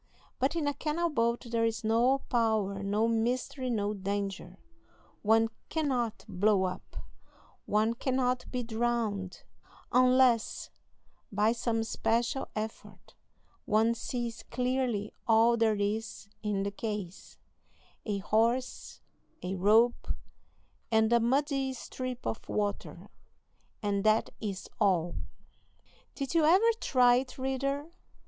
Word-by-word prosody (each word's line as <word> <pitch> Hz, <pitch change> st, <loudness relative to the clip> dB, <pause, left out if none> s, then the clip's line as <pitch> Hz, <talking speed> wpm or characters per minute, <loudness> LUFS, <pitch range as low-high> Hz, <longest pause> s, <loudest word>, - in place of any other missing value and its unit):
But 265 Hz, +5 st, +1 dB
in 315 Hz, -3 st, 0 dB
a 285 Hz, -, +1 dB
canal 325 Hz, +4 st, -1 dB
boat 235 Hz, -2 st, 0 dB
there 230 Hz, -1 st, +1 dB
is 225 Hz, 0 st, -1 dB
no 240 Hz, +5 st, +3 dB
power, 220 Hz, -4 st, +1 dB
no 205 Hz, +3 st, +1 dB
mystery, 245 Hz, +3 st, -1 dB
no 210 Hz, -3 st, 0 dB
danger; 195 Hz, -2 st, -4 dB, 0.6 s
one 225 Hz, +1 st, +4 dB, 0.2 s
cannot 260 Hz, -8 st, -1 dB
blow 200 Hz, 0 st, +2 dB
up, 185 Hz, 0 st, -5 dB, 0.7 s
one 215 Hz, +2 st, +2 dB
cannot 255 Hz, 0 st, -1 dB
be 250 Hz, -1 st, -2 dB
drowned 225 Hz, -5 st, -2 dB, 0.5 s
unless 255 Hz, -2 st, +3 dB, 0.6 s
by 210 Hz, +2 st, +3 dB
some 230 Hz, -1 st, -1 dB
special 235 Hz, +4 st, 0 dB
effort; 220 Hz, +1 st, -7 dB, 0.5 s
one 220 Hz, +2 st, +3 dB
sees 235 Hz, 0 st, -4 dB
clearly 250 Hz, -4 st, -1 dB
all 230 Hz, +1 st, +5 dB
there 225 Hz, -2 st, +2 dB
is 205 Hz, 0 st, -3 dB
in 205 Hz, -2 st, -1 dB
the 200 Hz, -, -2 dB
case 205 Hz, -4 st, -6 dB, 0.7 s
a 210 Hz, -2 st, -2 dB
horse, 230 Hz, +6 st, 0 dB, 0.4 s
a 180 Hz, +1 st, -2 dB
rope, 215 Hz, +6 st, +3 dB, 0.8 s
and 220 Hz, +1 st, +3 dB
a 235 Hz, -, +6 dB
muddy 270 Hz, +2 st, +1 dB
strip 255 Hz, 0 st, -6 dB
of -, -, -4 dB
water 205 Hz, -1 st, -3 dB, 0.7 s
and 200 Hz, -1 st, 0 dB
that 215 Hz, 0 st, +3 dB
is 195 Hz, -3 st, -5 dB
all. 175 Hz, -5 st, +2 dB, 1.0 s
Did 275 Hz, +1 st, -3 dB
you 330 Hz, -2 st, +4 dB
ever 380 Hz, +9 st, +5 dB
try 245 Hz, -2 st, +4 dB
it, 255 Hz, 0 st, -4 dB
reader? 275 Hz, +3 st, -2 dB
230 Hz, 115 wpm, -30 LUFS, 210-255 Hz, 1.0 s, a